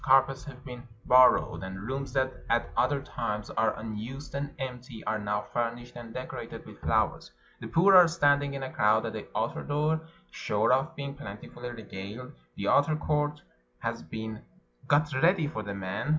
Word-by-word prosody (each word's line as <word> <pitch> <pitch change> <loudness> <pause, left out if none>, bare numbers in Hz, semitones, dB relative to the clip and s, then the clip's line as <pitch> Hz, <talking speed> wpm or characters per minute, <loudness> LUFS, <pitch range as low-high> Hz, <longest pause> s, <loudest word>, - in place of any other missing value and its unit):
Carpets 135 0 +4
have 130 -2 -11
been 125 -2 -7 0.2
borrowed, 125 0 +6
and 95 0 -6
rooms 135 +4 -3
that 130 -1 +1 0.2
at 120 0 +1
other 140 -1 +2
times 105 -5 -3
are 110 -1 +1
unused 115 +6 -6
and 140 +1 -2
empty 125 -4 -6
are 110 - -1
now 105 0 -1
furnished 120 +1 -2
and 120 -1 -8
decorated 130 +2 -6
with - - -13
flowers. - - +1 0.3
The - - -6
poor 190 +4 +5
are 180 -2 +10
standing 145 -3 +2
in 135 - -4
a 130 - -4
crowd 110 +1 +3
at - - -3
the - - -6
outer - - -1
door, 150 +2 +1 0.3
sure 110 +3 +1
of 155 +6 +1
being 140 -2 -4
plentifully 120 -1 -8
regaled. 110 +1 -8 0.2
The 100 - -3
outer 145 +2 +4
court 150 -1 0 0.3
has - - -3
been 110 +7 -6 0.5
got 145 +1 +5
ready 165 +5 +4
415 - - -2
PERSIA - - -11
for 110 - -2
the 100 -1 -5
men. 100 +5 -3
130 Hz, 180 wpm, -29 LUFS, 110-145 Hz, 0.5 s, are